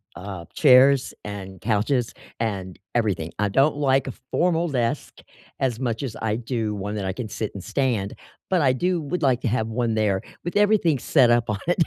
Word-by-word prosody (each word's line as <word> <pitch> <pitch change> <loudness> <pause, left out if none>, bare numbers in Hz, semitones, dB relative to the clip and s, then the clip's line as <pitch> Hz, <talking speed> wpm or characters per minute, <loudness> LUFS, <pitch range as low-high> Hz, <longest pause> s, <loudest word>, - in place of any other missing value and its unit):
uh, 95 -2 -7
chairs 135 -1 +5
and 95 -2 -7
couches 115 +3 0 0.3
and 95 -5 -3 0.2
everything, 95 -8 0
I 105 -1 +1
don't 140 +7 +3
like 135 -2 +2
a 130 - -4 0.2
formal 170 -1 +1
desk 125 +1 -2 0.4
as 125 -3 0
much 120 0 -2
as 120 -5 -4
I 110 -1 0
do 115 -3 -2
one 100 +2 -4
that 100 - -3
I 95 - -1
can 110 +2 -5
sit 110 0 -4
and 95 - -7
stand, 120 -8 -1 0.4
but 185 -4 +2
I 130 -2 +4
do 175 +5 0
would 165 +4 -3
like 130 -2 +3
to - - -1
have 110 -1 0
one 115 0 -1
there 100 -3 +1 0.2
with 175 - -4
everything 205 - +3
set 130 -3 +4
up 120 -1 +2
on 105 -1 -1
it. 175 -1 +3
120 Hz, 195 wpm, -24 LUFS, 105-140 Hz, 0.4 s, chairs